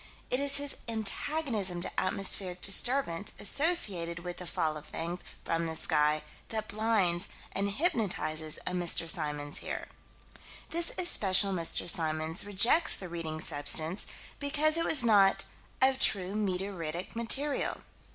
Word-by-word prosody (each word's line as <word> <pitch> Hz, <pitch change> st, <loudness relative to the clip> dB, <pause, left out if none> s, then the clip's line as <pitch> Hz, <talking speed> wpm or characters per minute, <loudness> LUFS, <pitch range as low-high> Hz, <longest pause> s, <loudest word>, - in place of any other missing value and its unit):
It 250 Hz, -, +1 dB
is 280 Hz, 0 st, +5 dB
his 285 Hz, 0 st, 0 dB
antagonism 220 Hz, -, -1 dB
to -, -, -4 dB
atmospheric 185 Hz, -1 st, +1 dB
disturbance 200 Hz, -3 st, +1 dB
associated 200 Hz, -, +1 dB
with 175 Hz, 0 st, -7 dB
the 180 Hz, -, -6 dB
fall 155 Hz, -1 st, -2 dB
of 150 Hz, 0 st, -10 dB
things 170 Hz, +3 st, -5 dB, 0.2 s
from 165 Hz, 0 st, -2 dB
the 160 Hz, -, -4 dB
sky 150 Hz, -1 st, +1 dB, 0.3 s
that 220 Hz, -1 st, -4 dB
blinds 205 Hz, -4 st, 0 dB, 0.2 s
and 200 Hz, +1 st, -2 dB
hypnotizes 200 Hz, -, -1 dB
a -, -, -2 dB
Mr. 175 Hz, -2 st, -1 dB
Symons 150 Hz, -3 st, -2 dB
here. -, -, -7 dB, 0.8 s
This 340 Hz, +1 st, 0 dB
especial 200 Hz, -, +2 dB
Mr. 170 Hz, -2 st, -1 dB
Symons 160 Hz, -1 st, 0 dB
rejects 205 Hz, -, +4 dB
the 185 Hz, -, -7 dB
Reading 165 Hz, -2 st, -5 dB
substance 155 Hz, +5 st, +3 dB, 0.3 s
because 300 Hz, +2 st, +1 dB
it 335 Hz, 0 st, +2 dB
was 270 Hz, -6 st, +8 dB
not 200 Hz, -4 st, +4 dB, 0.4 s
"of 265 Hz, 0 st, +2 dB
true 190 Hz, -5 st, +2 dB
meteoritic 185 Hz, -4 st, -4 dB
material." 270 Hz, +6 st, 0 dB
190 Hz, 130 wpm, -29 LUFS, 165-230 Hz, 0.8 s, was